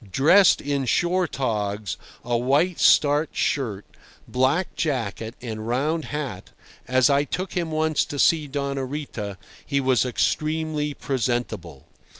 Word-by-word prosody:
Dressed 165 - +5
in 140 -1 -1
shore 175 +9 +1
togs, 105 - -2 0.3
a 120 0 0
white 140 +9 +1
starched 145 +1 +4
shirt, 110 -8 -1 0.4
black 135 +8 +1
jacket, 115 -6 -2
and 110 -2 -5
round 150 +7 0
hat, 140 -11 -5 0.4
as 130 0 +4
I 140 +1 +3
took 185 +6 -4
him 170 -2 -1
once 155 0 +1
to 145 - -6
see 155 +1 +3
Doña 140 -2 -3
Rita, 120 -9 -5 0.3
he 140 -1 0
was 130 -3 +2
extremely 155 +3 -1
presentable. 115 - -3
140 Hz, 130 wpm, -24 LUFS, 120-155 Hz, 0.4 s, Dressed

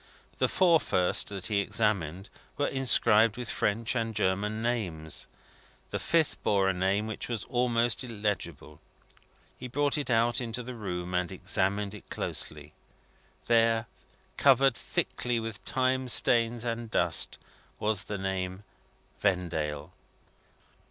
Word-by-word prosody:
The - - +3
four 175 -3 +4
first 90 -10 +2
that 100 -3 -5
he 105 -2 +1
examined, 100 -3 -1 0.3
were 145 - +1
inscribed 115 -5 +4
with 125 -2 -4
French 115 +4 0
and 115 -2 -2
German 105 +2 0
names. 90 -11 -2 0.6
The - - -2
fifth 165 -3 0
bore 100 -2 +2
a 95 - +2
name 95 +3 0
which 110 +2 -4
was 115 -3 -2
almost 120 -1 +1
illegible. 100 - -4 0.8
He 125 - -6
brought 145 +4 0
it 145 - -4
out 120 +2 +2
into 120 +1 -4
the 125 +2 -7
room, 90 -5 -5
and 90 -1 -1
examined 100 +1 -1
it 105 - -12
closely. 75 0 -3 0.7
There, 115 -1 +3 0.5
covered 135 -2 +5
thickly 120 -1 -2
with 110 -4 -6
time 130 +4 0
stains 120 -1 +4
and 115 -1 -3
dust, - - +2 0.4
was 105 -2 0
the 105 - -4
name: 95 0 -3 0.6
"Vendale." 85 -5 -1
110 Hz, 130 wpm, -28 LUFS, 95-120 Hz, 0.8 s, covered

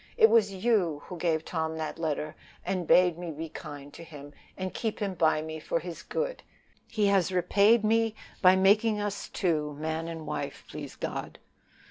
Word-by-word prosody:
It 445 -2 +7
was 210 -3 +4
you 180 -11 +2
that 180 - -7
gave 160 -2 0
Tom 160 -1 -2
the 155 -1 -3
letter, 155 -2 -3 0.3
and 180 -4 -2
bade 180 -2 +5
me 175 -1 -5
be 160 +1 -6
kind 145 -1 -9
to 170 - -10
him, 145 -3 -11 0.2
and 185 0 -4
keep 220 -2 -2
him 200 -3 -2
by 160 -3 +2
me 160 0 -6
for 165 - -1
his 170 -1 -7
good; - - -3 0.5
he 215 -2 0
has 195 -2 +3
repaid 200 +5 +4
me 225 0 +2 0.3
by 185 0 +7
making 210 +3 +4
us 205 -1 -3
two 155 -5 0
man 160 +2 -3
and 165 -2 -6
wife, - - -4
please - - -8
God. - - -5
175 Hz, 180 wpm, -28 LUFS, 160-205 Hz, 0.5 s, It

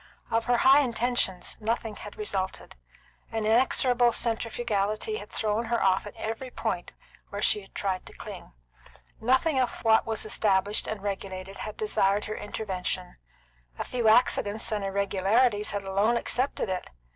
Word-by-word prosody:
Of 225 0 +1
her 245 0 +3
high 270 +4 +7
intentions, 240 -7 0
nothing 225 0 -2
had 210 - -10
resulted. 195 -3 -3 0.6
An 220 -1 -2
inexorable 245 +1 +4
centrifugality 225 - -1
had - - -9
thrown 220 +1 -1
her 235 0 0
off 190 +1 +2
at - - -10
every 225 +4 -4
point 220 -7 -3 0.4
where 200 - -5
she 205 -1 +1
tried 190 -2 -2
to - - -10
cling. - - -9 0.7
Nothing 260 +5 +2
of 255 - +2
what 225 -1 +4
was 220 -1 -1
established 205 -1 +2
and 215 -2 -4
regulated 195 -1 -5
had 215 - -6
desired 205 -1 +2
her 215 - -4
intervention; 185 -3 -3 0.6
a - - -2
few 240 -3 -1
accidents 220 -2 +3
and 210 -2 -1
irregularities 200 +3 +2
had 200 -1 -2
alone 200 +5 +2
accepted 255 +1 0
it. 185 -1 -3
215 Hz, 145 wpm, -27 LUFS, 195-235 Hz, 0.7 s, high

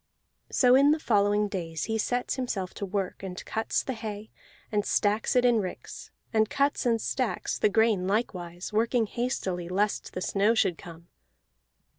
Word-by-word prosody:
So 250 -1 +4
in 275 +2 +6
the 305 - +4
following 205 -4 +2
days 165 -6 -4
he 220 0 -1
sets 245 +3 -1
himself 205 -8 -3
to 200 - -5
work, 190 -1 -3
and 185 -2 -7
cuts 220 0 -1
the 265 - -3
hay, 220 -2 -7 0.4
and 210 -1 +1
stacks 210 +4 +1
it 250 0 +4
in 240 -2 +4
ricks; 185 -3 -6 0.2
and 220 -1 +3
cuts 280 -2 +1
and 230 -1 +2
stacks 255 +1 -2
the - - +4
grain 215 -3 +2
likewise, 185 -4 -3
working 230 +2 +2
hastily 190 -7 -3
lest 200 +3 -1
the 185 - -4
snow 205 +5 +2
should 180 -6 +1
come. 170 0 -12
210 Hz, 165 wpm, -28 LUFS, 190-235 Hz, 0.4 s, in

